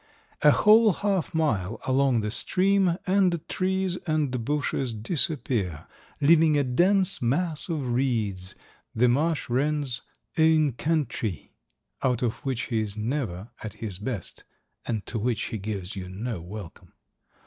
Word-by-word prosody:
A 150 - +7
whole 215 +6 +6
half 195 -1 -1
mile 115 - 0
along 130 -2 +2
the 105 0 -3
stream 190 - +2
and 185 -3 +2
trees 190 -1 -1
and 145 -6 0
bushes 140 -3 -1
disappear, 110 - -1 0.3
leaving 155 0 +5
a 145 - +3
dense 180 +9 +2
mass 155 +8 +1
of 145 -7 -2
reeds, 110 -8 -1 0.4
the 120 +3 +4
marsh 150 +6 +1
wren's 140 0 +1 0.4
"ain 160 -2 +4
countrie," 130 - -2 0.5
out 125 -1 +1
of 115 -2 0
which 130 -3 -2
he 110 - +2
is 105 -1 -3
never 110 -4 -3
at 110 -2 -6
his 105 -4 -6
best 105 -4 -5 0.4
and 110 -4 -2
to 115 - -4
which 115 0 -1
he 110 - -2
gives 100 -2 -5
you 90 -2 -6
no 105 0 -4
welcome. 90 -1 -10
130 Hz, 135 wpm, -26 LUFS, 110-160 Hz, 0.5 s, A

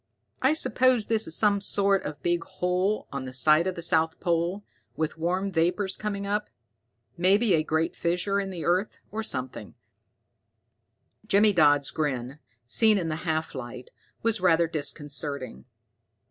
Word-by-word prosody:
"I 265 +3 +4
suppose 255 -5 +2
this 220 -1 0
is 160 - +1
some 205 -2 +3
sort 200 -1 +2
of 150 -1 -7
big 175 -1 0
hole 180 +4 -1
on 140 -1 -5
the 130 - -8
site 155 +7 +3
of 185 - -2
the 170 - -7
south 160 -1 +1
pole, 175 +3 -1 0.3
with 160 +1 -3
warm 185 +4 -1
vapors 185 +3 0
coming 200 -2 -4
up. 210 +1 -2 0.7
Maybe 195 +4 +3
a 160 - +3
great 160 +2 -1
fissure 180 +4 0
in 195 -1 -3
the 175 -4 -6
earth, 180 +4 0
or 220 +2 -3
something." 130 - -4 1.5
Jimmy 205 +1 +4
Dodd's 145 -5 +3
grin, 135 -2 -3 0.3
seen 215 - +4
in 170 -4 -2
the 155 - -2
half 160 0 -2
light, 125 -1 -8 0.3
was 225 -3 0
rather 170 -2 +4
disconcerting. 145 - -3
175 Hz, 150 wpm, -26 LUFS, 155-200 Hz, 1.5 s, I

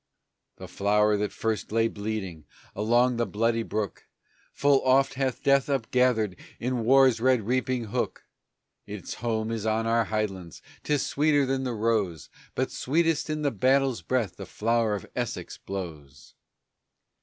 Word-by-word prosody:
The - - -9
Flower 105 +1 +2
that 105 0 -2
first 110 -3 -3
lay 115 +1 +3
bleeding 100 -7 -5 0.3
along 120 +4 +2
by 120 - +1
Bloody 115 +3 0
Brook 105 -3 -4 0.4
Full 140 -1 +3
oft 135 +1 +3
hath 130 -2 -2
Death 140 0 +3
upgathered 125 -6 +1 0.2
in 125 -1 -1
war's 130 -1 +5
red 130 -2 +3
reaping 125 +2 0
hook; 105 - -3 0.6
Its - - -6
home 110 -1 -1
is 110 -1 -3
on 110 +1 +1
our 115 0 +2
headlands; 95 -7 -4 0.2
'tis 150 -2 0
sweeter 145 -1 +2
than 135 0 -1
the 125 - -2
rose; 105 -7 -1 0.2
But - - -1
sweetest 160 +2 0
in 155 0 -2
the 145 - +2
battle's 130 0 +2
breath 105 -1 -1
the - - -8
Flower 115 -1 0
of 100 - -6
Essex - - -4
blows. 75 -8 -8
115 Hz, 145 wpm, -27 LUFS, 105-130 Hz, 0.6 s, war's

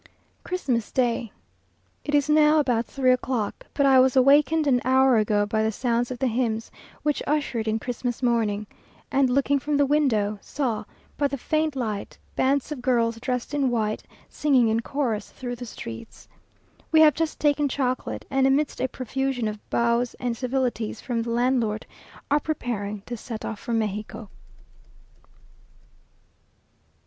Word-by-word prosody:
Christmas 255 - -2
day. 240 -3 0 0.7
It 290 - -1
is 290 0 +3
now 305 0 +5
about 245 -5 +1
three 260 -2 +2
o'clock, 250 -4 -2
but 280 - +3
I 265 -1 +6
was 260 0 +4
awakened 290 +4 +5
an 250 -3 +3
hour 260 -1 +4
ago 210 -1 +2
by 215 +1 0
the 220 0 +1
sounds 240 +1 0
of 255 - -5
the 265 - -1
hymns 225 -2 -1 0.3
which 295 -1 0
ushered 275 -6 -1
in 220 0 +1
Christmas 245 +1 -4
morning; 220 -4 +1 0.5
and 270 -1 +3
looking 275 +2 +2
from 290 +2 -1
the 285 - +4
window, 225 -8 +1
saw, 230 -7 -2 0.3
by 285 - +3
the 280 0 -4
faint 310 +2 0
light, 215 -6 -4 0.2
bands 275 +2 +1
of 285 -4 -4
girls 235 -2 +1
dressed 250 +2 -3
in 280 -3 +2
white, 215 -3 -1 0.3
singing 265 -6 +2
in 220 +1 +2
chorus 230 -4 -2
through 245 -1 -6
the 245 0 -8
streets. 115 - -9 0.6
We 315 -1 +6
have 305 -2 +7
just 325 -1 -2
taken 295 -1 +2
chocolate, 255 -1 -2
and, 270 0 +3
amidst 280 +2 +1
a 260 - +2
profusion 260 -1 -2
of 210 -1 -7
bows 235 +1 +1
and 245 -2 -2
civilities 245 -4 -2
from 240 -3 -2
the 230 - -4
landlord, 235 -3 +1 0.5
are 290 - +4
preparing 210 -10 -3
to 240 - -5
set 225 -1 -7
off 220 - -5
for 235 - -4
Mexico. 215 -1 -3
250 Hz, 155 wpm, -25 LUFS, 225-275 Hz, 0.7 s, have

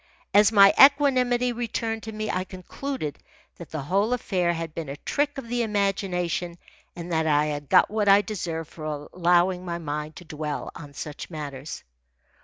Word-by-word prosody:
As 210 +1 +6
my 200 -2 +7
equanimity 255 -3 +5
returned 225 -1 -3
to 220 - -7
me, 215 0 -3
I 185 - -1
concluded 185 - -6 0.4
that 170 - -10
the 155 -3 -4
whole 200 - +1
affair 185 -7 0
had 165 -2 -4
been 160 -4 -5
a 140 - -6
trick 290 - -1
of 265 -4 -6
the 240 +1 -1
imagination 190 -5 -1 0.4
and 175 0 -7
that 160 -1 +1
I 150 -1 +3
had 145 -2 -4
got - - +5
what 210 -2 +1
I 200 +1 +7
deserved 165 -7 -4
for 155 -2 -6
allowing 180 +1 +2
my 170 -1 -3
mind 150 -1 -5
to 175 - -11
dwell 150 -1 -5
on 145 -2 -11
such 150 -2 -7
matters. 145 -3 -7
180 Hz, 175 wpm, -25 LUFS, 155-220 Hz, 0.4 s, my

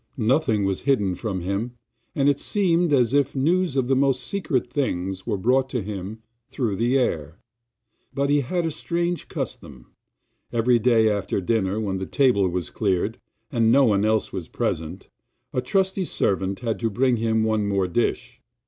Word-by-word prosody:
Nothing 115 -3 +2
was 95 -1 -1
hidden 105 -10 +1
from 95 -1 -4
him, 100 +7 -3 0.4
and 140 -1 +2
it 145 -1 +3
seemed 175 -5 +1
as 125 -3 +3
if 140 -1 +2
news 170 +3 +1
of 130 -2 +1
the 135 - +2
most 135 -1 +2
secret 165 - -1
things 95 -8 -3
was 100 - -1
brought 130 +4 +2
to 125 -5 -2
him 105 +2 -6 0.3
through 115 -7 -2
the 120 +5 +2
air. 80 - -1 0.7
But 140 +1 0
he 145 - +4
had 170 +6 -2
a 165 - -1
strange 170 +2 -2
custom; 95 - -7 0.6
every 120 +1 +3
day 115 -1 +4
after 100 -2 0
dinner, 100 0 0
when 95 -3 -2
the 95 - -4
table 125 -9 +3
was 90 -1 -4
cleared, 100 +1 -1 0.3
and 115 -2 +3
no 135 +2 +5
one 100 -3 +2
else 110 0 +1
was 90 -4 -5
present, 80 +4 -3 0.5
a 125 - 0
trusty 190 +7 0
servant 95 - -1
had 115 -3 -2
to 115 - 0
bring 125 +3 +1
him 110 0 +1
one 110 -2 +1
more 100 -2 +1
dish. 115 +7 -2
115 Hz, 175 wpm, -24 LUFS, 100-135 Hz, 0.7 s, no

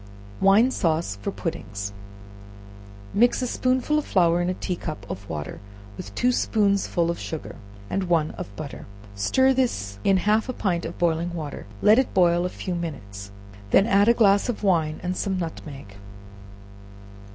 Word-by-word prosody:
Wine 210 +6 +5
Sauce 160 - 0
for - - -2
Puddings. 100 0 -5 1.2
Mix 240 +4 +3
a - - +1
spoonful 255 +4 +1
of 300 - -5
flour 175 -2 +3
in 175 - 0
a 185 - -1
tea 180 - -3
cup 155 - -6
of 100 +1 -7
water, 75 -2 -5 0.4
with 100 0 -9
two 250 - +2
spoonsful 200 -7 +1
of 170 - -6
sugar 160 - -6 0.3
and 195 - -1
one 165 -3 +1
of 100 - -8
butter; 140 +3 -8 0.3
stir 260 - +3
this 105 - -1
in 195 - +4
half 215 +6 +1
a - - -1
pint 175 -7 -1
of 165 - -6
boiling 170 0 0
water; 150 -9 -6 0.2
let 215 +4 +7
it 260 - -1
boil 175 -1 +4
a - - -1
few 180 - -5
minutes, 100 - -6 0.4
when 195 - +5
add 200 -1 +4
a 235 - +5
glass 200 -1 +4
of 230 - -3
wine 160 -6 +1
and 180 +1 -2
some 190 0 -1
nutmeg. 145 - -7
175 Hz, 165 wpm, -24 LUFS, 155-205 Hz, 1.2 s, let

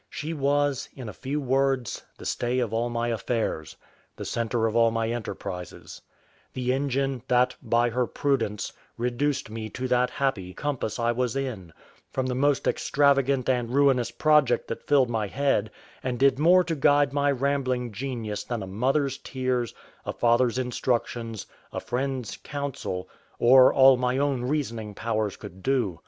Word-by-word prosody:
She 155 +2 -4
was, 145 -2 0
in 130 -4 -7
a 105 - -6
few 140 +3 -3
words, 135 -2 0 0.2
the - - -11
stay 120 +1 -1
of 120 -4 -1
all 115 +2 0
my 120 0 -1
affairs; 110 -8 -2 0.4
the - - -7
centre 115 0 -1
of 110 0 -1
all 115 -1 +5
my 115 0 -1
enterprises; 100 -6 -6 0.5
the 125 0 0
engine 135 -1 -1
that, 125 0 +3
by 120 0 +2
her 125 +1 0
prudence, 115 -8 -1 0.2
reduced 125 +1 -1
me 110 -1 -5
to 130 +3 -4
that 125 0 +3
happy 110 -9 -2
compass 145 -7 -2
I 120 -1 +1
was 125 0 -1
in, 120 -11 -4 0.4
from 130 - -1
the 130 - -1
most 140 +2 +1
extravagant 140 -2 +2
and 125 -3 +1
ruinous 130 -3 +3
project 150 -3 +3
that 115 - -6
filled 135 -4 +4
my 110 -2 -1
head, 130 -3 +1 0.3
and 125 -1 -2
did 135 +1 +3
more 180 +4 +6
to 165 -1 -2
guide 145 -1 +3
my 145 0 +2
rambling 130 -3 0
genius 110 -3 -4
than 120 -4 -4
a - - -7
mother's 130 +7 0
tears, 130 -3 -2 0.3
a - - -4
father's 120 +1 +2
instructions, 120 -3 -2 0.3
a - - -3
friend's 130 -2 -3
counsel, 140 -11 -5 0.3
or 130 +2 +7
all 135 -1 +7
my 125 +1 0
own 135 -3 0
reasoning 115 -7 -2
powers 110 -3 -2
could 95 +2 -11
do. 120 - 0
125 Hz, 160 wpm, -26 LUFS, 115-135 Hz, 0.5 s, or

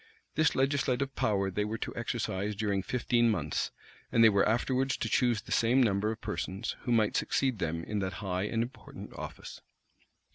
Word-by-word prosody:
This 155 +1 +2
legislative 135 0 +1
power 100 -2 +1
they 105 +3 0
were 110 +2 -3
to - - -5
exercise 100 +3 -2
during 100 -2 0
fifteen 120 +3 +2
months; 80 -9 -1 0.4
and 115 - +5
they 110 - +9
were 100 0 +3
afterwards 130 +4 +1
to - - -2
choose 120 -5 +2
the - - -12
same 125 +3 +4
number 105 -1 +1
of 110 - -6
persons, 95 +6 -3
who 120 - 0
might 110 -3 +3
succeed 130 -6 +1
them 85 -1 -2
in 105 +3 -2
that 95 -1 -2
high 95 0 -2
and 115 +2 0
important 120 - -9
office. - - -8
110 Hz, 180 wpm, -30 LUFS, 100-125 Hz, 0.4 s, they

